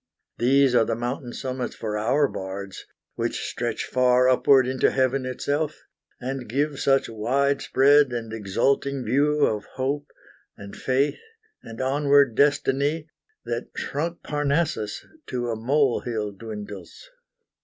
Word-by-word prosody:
These 135 +2 +4
are 120 -2 +5
the 115 0 -1
mountain 120 +1 -4
summits 130 0 -4
for 105 -2 -4
our 125 +7 +2
bards, 95 -1 -7 0.3
Which - - -3
stretch - - -3
far 125 0 +3
upward 130 0 +5
into 130 0 +2
heaven 130 0 0
itself, 145 +4 -2 0.4
And 130 -2 -5
give 140 +3 -1
such 135 0 +2
wide 135 +6 0
spread 140 0 +4
and 115 -2 -4
exulting 125 +6 0
view 145 +5 +3
Of 105 -1 -2
hope, 140 +3 -2 0.5
and 100 -1 -10
faith, 135 +3 0 0.4
and 115 0 -10
onward 140 -1 +3
destiny, 145 +3 +1 0.3
That - - -3
shrunk 165 +4 -3
Parnassus 145 -6 -1 0.2
to 120 -2 -2
a - - -1
molehill 120 -3 0
dwindles. 105 - -9
130 Hz, 125 wpm, -24 LUFS, 115-140 Hz, 0.5 s, are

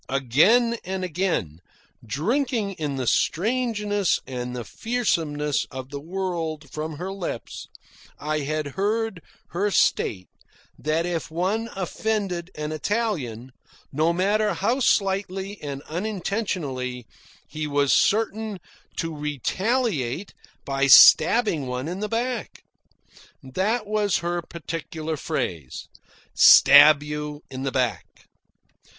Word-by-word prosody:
Again 160 - +3
and 190 0 -4
again, 165 - -2 0.4
drinking 215 - -1
in 145 -3 -2
the 130 -1 -3
strangeness 210 - +1
and 125 -1 -5
the 120 - -4
fearsomeness 160 - -1
of 130 -1 -8
the 140 - -5
world 165 -4 -4
from 155 0 -5
her 185 +4 -5
lips, 180 - -6 0.5
I 155 +1 -2
had 150 +1 -2
heard 210 +2 -1 0.3
her 195 +5 0
state 95 - +1 0.5
that 155 +2 0
if 175 -2 -3
one 190 +8 -1
offended 190 -2 -2
an 150 0 -4
Italian, 155 - -2 0.4
no 155 +4 +2
matter 205 +5 +1
how 235 +7 0
slightly 195 -3 0
and 140 -1 -6
unintentionally, 170 - -3 0.4
he 155 0 -4
was 145 -1 +2
certain 215 -1 +1 0.4
to 165 -1 -3
retaliate 160 - -1 0.3
by 135 0 0
stabbing 160 - +7
one 125 +3 -3
in 180 +3 -4
the 210 0 -3
back. 240 +2 -3 0.8
That 200 - -1
was 210 -2 +1
her 175 0 -1
particular 160 -1 -5
phrase 85 - -4 0.4
"stab 145 +1 +8
you 150 0 -5
in 130 0 -6
the 135 0 -2
back." 125 -4 -3
165 Hz, 110 wpm, -24 LUFS, 145-205 Hz, 0.8 s, stab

